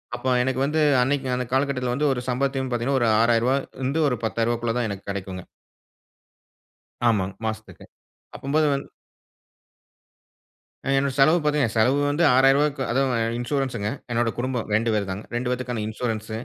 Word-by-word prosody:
அப்ப 125 +2 -5 0.2
எனக்கு 130 0 -1
வந்து 155 +2 0 0.2
அன்னைக்கு 135 +1 0
அந்த 125 0 -2
காலகட்டத்தில 130 -2 0
வந்து 145 +2 +1
ஒரு 125 - -4
சம்பாத்தையும் 130 +1 -1
பார்த்தீங்கனா 125 +3 0
ஒரு 115 - +3
ரூ.6,000 120 +2 +3 0.3
இருந்து 145 +4 +1 0.2
ரூ.10,000க்குள்ள 115 +1 -1
தான் 120 -2 0
எனக்கு 100 0 -7
கிடைக்குங்க. 95 -2 -6 1.6
ஆமா. 105 -5 +2 0.2
மாசத்துக்கு, 110 0 -6 0.5
அப்பம்போது 150 +3 +1
வந் 140 - -4 2.0
அ - - -5
என்னுடைய 135 -1 0
செலவு 155 +5 +5
பார்த்தீங்கனா 145 -6 +1
செலவு 125 +6 +3
வந்து 155 +4 +1
ரூ.6,000க்கு 135 +1 +3
அது 130 - +1 0.4
இன்சூரன்ஸ்ங்க, 120 -4 -2 0.2
என்னோட 120 0 +1
குடும்பம் 125 -3 -3
2 110 +2 +2
பேர் 100 -2 0
தாங்க, 100 +3 -5
2 120 +1 -2
பேத்துக்கான 125 -3 -3
இன்சூரன்ஸ், 110 -1 -4
125 Hz, 140 wpm, -24 LUFS, 115-135 Hz, 2.0 s, செலவு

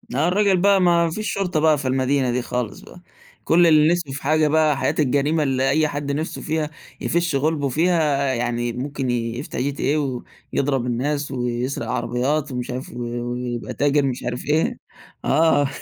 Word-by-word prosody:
آه، 145 +5 +2
الرجل 195 +1 +3
بقى 195 +1 +4
ما 170 -1 +4
ما - - 0
فيش 215 +5 -3
شُرطة 185 -4 -1
بقى 155 -1 +4
في 135 -2 -4
المدينة 130 0 +1
دي 125 +1 0
خالص 125 -2 -4
بقى. 180 - -14 0.4
كل 170 +1 +4
اللي 155 0 +5
نِفسه 175 -5 -3
في 140 +1 -6
حاجة 155 +2 +3
بقى 155 -2 +3
حياة - - 0
الجريمة، 145 +3 +2
اللي 135 -1 +1
أي 155 0 +3
حدّ 145 -1 -3
نِفسه 155 +4 -3
فيها 155 -1 -2 0.3
يفش 170 -3 0
غُلبُه 145 0 0
فيها، 150 -3 +1
يعني 120 -1 -1
مُمكن 135 +1 -3
يفتح 120 +2 -3
GTA 140 +2 0 0.6
ويضرب 135 -3 0
الناس 140 +4 -2
ويسرق 125 -1 -2
عربيات 135 +7 -1
ومش 125 -1 -4
عارف 125 +1 -5
و 120 - -6 0.3
ويبقى 125 -1 -4
تاجر 145 0 +2
مش 130 -2 -3
عارف 120 0 -4
إيه 155 +3 +1 0.5
آه 145 -1 +3
145 Hz, 175 wpm, -22 LUFS, 125-155 Hz, 0.6 s, اللي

